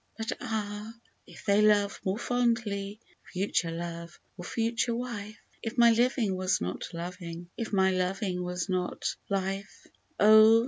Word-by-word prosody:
But 225 0 -2
ah! 210 0 -4 0.3
if - - -13
they 200 0 +4
love 210 -1 +3
more 190 +2 0
fondly 225 -4 0 0.3
(future 180 -3 0
love 170 0 -6 0.2
or 175 - -8
future 230 +3 0
wife). 215 -3 -5 0.2
If 225 +2 -5
my 235 -1 +7
living 235 -3 +2
was 185 0 +1
not 90 - -4
loving 170 0 -7
— - - -43
if 230 -2 -4
my 190 -2 +4
loving 185 0 -1
was 180 0 -3
not 185 -2 -1
Life^ 195 0 -3 0.3
Oh 220 +2 +8
200 Hz, 145 wpm, -29 LUFS, 180-225 Hz, 0.3 s, Oh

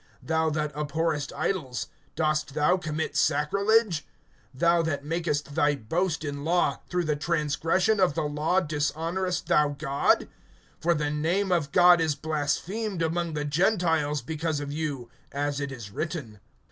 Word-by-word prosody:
Thou 160 0 +1
that 150 -1 -2
abhorrest 150 0 -1
idols, 130 - -2 0.3
dost 155 -2 0
thou 150 +4 +4
commit 155 -4 -3
sacrilege[2:22]? 170 +6 +2 0.6
(23)Thou 170 +2 +3
that 145 -3 -2
makest 150 -3 -2
thy 145 -2 +3
boast 155 - -1
in 145 -1 -4
law, 170 +2 +1
through 180 -1 0
the 155 -2 0
transgression 165 +6 +1
of 180 -6 +3
the 160 - 0
law 150 +5 +1
dishonorest 165 +4 -1
thou 150 -1 +3
God? 140 -1 +2 0.5
(24)For, 170 0 +2
the 150 -1 -1
name 175 +6 0
of 165 -5 +1
God 175 0 +6
is 160 -3 +1
blasphemed 165 +7 -2
among 165 0 -1
the 150 0 -2
Gentiles 160 - +1
because 160 +2 -2
of 145 -1 -5
you, 145 -6 -4 0.2
as 145 0 -1
it 140 -1 -3
is 115 -6 -8
written. 140 - -5
155 Hz, 145 wpm, -27 LUFS, 145-170 Hz, 0.6 s, God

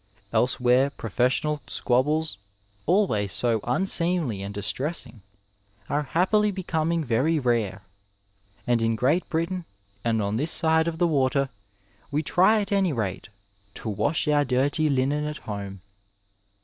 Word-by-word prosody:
Elsewhere 125 +3 +3
professional 130 +5 -1
squabbles, 145 0 0 0.5
always 155 - +2
so 115 -2 +1
unseemly 165 - +1
and 100 +1 -5
distressing, 115 - -4 0.7
are 145 - +1
happily 190 +8 +2
becoming 170 -4 -1
very 135 +7 +2
rare, 115 -8 0 0.8
and 120 -1 +2
in 115 0 +1
Great 140 +10 +1
Britain, 170 +3 -1 0.4
and 115 -1 +1
on 105 +1 -1
this 150 +6 0
side 160 0 +2
of 165 -1 -2
the 175 - +2
water, 140 -2 +1 0.6
we 150 +2 -1
try 200 +8 +4
at 200 0 -5
any 195 -3 +2
rate 105 -9 -3 0.2
'' 100 0 -35
to 110 - -5
wash 145 +11 0
our 145 -1 +3
dirty 140 +4 +1
linen 140 +2 +1
at 150 0 -4
home.'' 100 -2 -7
140 Hz, 135 wpm, -25 LUFS, 115-160 Hz, 0.8 s, try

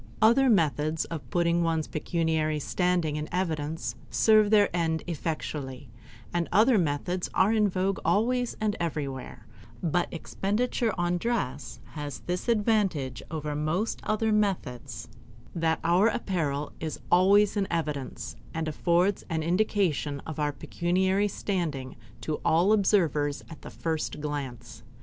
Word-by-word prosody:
Other 235 +5 +5
methods 155 - +2
of 165 -4 -7
putting 170 -1 +2
one's 165 -2 +1
pecuniary 160 -1 0
standing 175 -1 0
in 150 0 -4
evidence 160 -3 -2 0.2
serve 215 -2 +5
their 205 -4 +4
end 160 -2 0
effectually, 145 -5 -4 0.4
and 175 -1 0
other 220 +2 +5
methods 175 +3 -1
are 205 +4 +4
in 210 -2 +3
vogue 190 +1 0
always 245 +3 +1
and 215 -1 0
everywhere; 135 -7 -4 0.4
but 175 +1 0
expenditure 215 +7 -1
on 175 0 0
dress 145 - -2
has 145 -4 -6
this 180 +6 -3
advantage 200 - +1
over 155 -2 -3
most 155 +9 -1
other 215 +1 0
methods, 150 - -1 0.5
that 165 -1 +1
our 175 +6 +4
apparel 155 -10 -1
is 160 -1 -4
always 200 +4 +5
in 200 -2 0
evidence 140 -7 -3 0.2
and 160 0 -2
affords 175 +5 +1
an 160 -2 -1
indication 175 -5 +1
of 155 -1 -7
our 150 -1 +1
pecuniary 185 +6 0
standing 165 -10 -3 0.3
to 155 - -3
all 175 +6 +4
observers 165 -8 +2
at 160 - -10
the - - -9
first 160 -2 -3
glance. 125 -6 -5
170 Hz, 130 wpm, -28 LUFS, 150-200 Hz, 0.5 s, Other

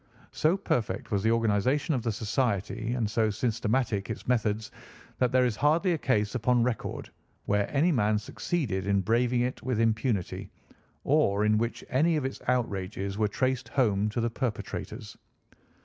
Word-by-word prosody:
So 165 +5 +2
perfect 125 - -2
was 100 -2 +1
the 110 - +2
organisation 115 - +2
of 130 - 0
the 115 - -1
society, 110 0 -1
and 115 -4 0
so 110 +1 +1
systematic 110 -1 -1
its - - -6
methods, 110 -3 0 0.5
that 125 -1 +2
there 130 0 +4
is 120 -4 0
hardly 165 +5 +3
a - - 0
case 105 -7 +1
upon 125 0 +2
record 120 -2 -3 0.3
where 105 0 +1
any 155 +6 +3
man 110 -6 +2
succeeded 105 - -2
in 100 -1 +2
braving 120 +4 +2
it 125 +1 -2
with 125 -3 -1
impunity, 110 -3 0 0.5
or 105 -9 +2
in 105 0 +3
which 115 +1 -2
any 160 +6 +2
of 150 -4 -1
its 135 - -4
outrages 100 -4 -1
were 105 - +3
traced 130 +4 -1
home 105 -5 +2
to 105 - -3
the 115 0 0
perpetrators. 120 -2 -5
115 Hz, 165 wpm, -28 LUFS, 105-130 Hz, 0.5 s, there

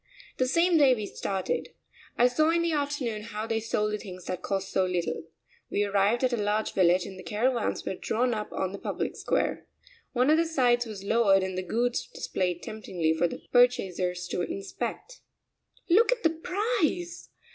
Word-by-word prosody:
The 255 - +2
same 335 +4 +3
day 270 -3 +6
we 215 -3 -4
started. 200 - -3 0.4
I 245 - +6
saw 310 +6 +2
in 335 +1 +2
the 335 - +1
afternoon 285 -7 -1
how 215 0 -5
they 225 0 0
sold 210 -1 -1
the 210 - -2
things 185 -3 -9
that 185 -1 -4
cost 195 0 -2
so 190 - +2
little. 180 -3 -2 0.4
We 205 - +1
arrived 205 +4 +2
at 255 -1 +2
a - - +1
large 210 +1 0
village 180 -1 +3
and 190 -1 -9
the - - -9
caravans 235 +3 0
were - - -2
drawn 240 +6 0
up 210 -1 -4
on 190 -1 -2
the 200 - -7
public - - -3
square. - - -1 0.5
One 255 +3 +3
of 310 - +5
the 335 - +3
sides 245 -6 +2
was 205 -3 -7
lowered 200 -3 +4
and 190 -1 -3
the 185 - -1
goods 235 +6 -1
displayed 180 -2 -3
temptingly 175 -7 -1
for 160 +2 +2
the - - -8
purchasers 185 -8 +2
to - - -1
inspect. 195 - -5 0.7
"Look 425 +8 +5
at - - -1
the 325 - +4
price! 360 -1 -1
220 Hz, 190 wpm, -28 LUFS, 190-280 Hz, 0.7 s, day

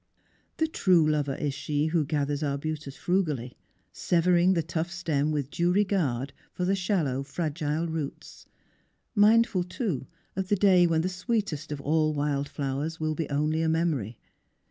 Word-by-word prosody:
The 320 - +2
true 180 - +3
lover 145 -3 0
is 145 -2 -2
she 145 +1 -1
who 160 -1 +1
gathers 145 -1 -1
arbutus 145 0 -3
frugally, 150 -10 -1 0.4
severing 175 +1 +3
the 165 - +1
tough 165 +1 -2
stem 160 -5 -1
with 145 -3 -2
due 175 +1 +1
regard 165 - 0 0.2
for 180 - -3
the 190 - +2
shallow, 180 -9 0
fragile 150 +2 -2
roots; 160 -4 -6 0.7
mindful 215 -3 +4
too 180 - -3 0.3
of 190 0 -2
the 205 - +3
day 185 -3 +5
when 160 -1 +2
the 175 - -1
sweetest 180 - -2
of 145 - -3
all 155 +1 +1
wild 145 -1 -1
flowers 145 +4 -3
will 155 0 0
be 160 +1 -3
only 150 +2 0
a 160 - +1
memory. 155 -10 0
160 Hz, 155 wpm, -27 LUFS, 145-180 Hz, 0.7 s, day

